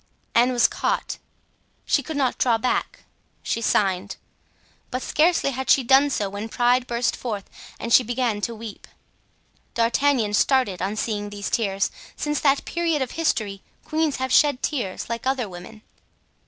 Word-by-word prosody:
'" - - -42
Anne 245 +2 +4
was 240 -1 +4
caught, - - -2 0.7
she 285 - +2
could 300 +3 -5
not 260 -3 0
draw 235 -3 +3
back—she 230 -1 -4
signed; 195 -3 +1 0.7
but 255 +1 -3
scarcely 315 -2 +2
had 265 0 -4
she 270 - +5
done 270 +4 +5
so 210 -7 -1
when 205 +3 -6
pride 245 +2 +2
burst 235 0 0
forth 210 -5 -5 0.3
and 230 - -2
she - - +8
began 240 -3 -1
to 230 +2 -2
weep. 220 -1 -9 0.9
D'Artagnan 235 -1 +2
started 230 -4 +2
on 195 +3 -1
seeing 210 -2 -2
these 205 0 -5
tears. 200 -4 0 0.2
Since 295 -1 -1
that 275 -1 +2
period 330 -4 0
of 255 - -7
history 215 -12 -1 0.2
queens 310 -2 0
have 260 0 -3
shed 290 -4 +4
tears, 230 -11 -2
like 230 +2 -4
other 260 -4 0
women. 190 +4 -11
240 Hz, 155 wpm, -23 LUFS, 210-270 Hz, 0.9 s, she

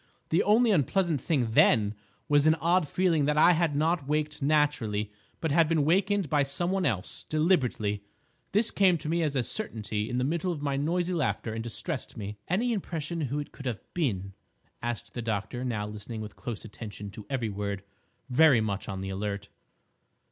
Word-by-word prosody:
The 165 - +3
only 225 +3 +4
unpleasant 170 - +2
thing 130 -8 0
then 105 -2 +4 0.3
was 145 +1 +4
an 155 - +6
odd 170 +1 +2
feeling 165 -3 +2
that 150 +1 +1
I 165 +3 +7
had 165 -3 +1
not 160 0 +1
waked 150 0 -1
naturally, 135 -8 +1 0.3
but 160 - -1
had 160 +1 +4
been 160 -3 +2
wakened 195 +3 +2
by 145 +1 +2
some 175 +6 0
one 190 -2 +1
else—deliberately. 125 - 0 0.5
This 215 +3 +2
came 185 -3 +4
to 150 - -7
me 170 +2 +1
as 150 -3 0
a 130 - +2
certainty 110 - -3
in 125 - -2
the 125 - +1
middle 170 +6 0
of 165 - -4
my 140 -1 0
noisy 175 +5 0
laughter 150 -8 -1
and 115 0 -3
distressed 130 +4 -4
me." 105 -1 -6
"Any 230 +8 +1
impression 170 -5 -3
who 140 0 -2
it 145 - -4
could 135 - -7
have 115 -5 -2
been?" 100 - -1 0.5
asked 120 -1 -4
the 120 - -4
doctor, 110 +2 -3
now 110 -5 -2
listening 105 +2 -7
with 105 -1 -8
close 115 -2 -6
attention 105 -2 -8
to 105 +1 -10
every 125 -5 -1
word, 100 -1 -3 0.4
very 135 -1 +6
much 100 -3 -2
on 95 -1 -4
the 95 - -4
alert. 100 0 -4
140 Hz, 185 wpm, -28 LUFS, 110-165 Hz, 0.5 s, I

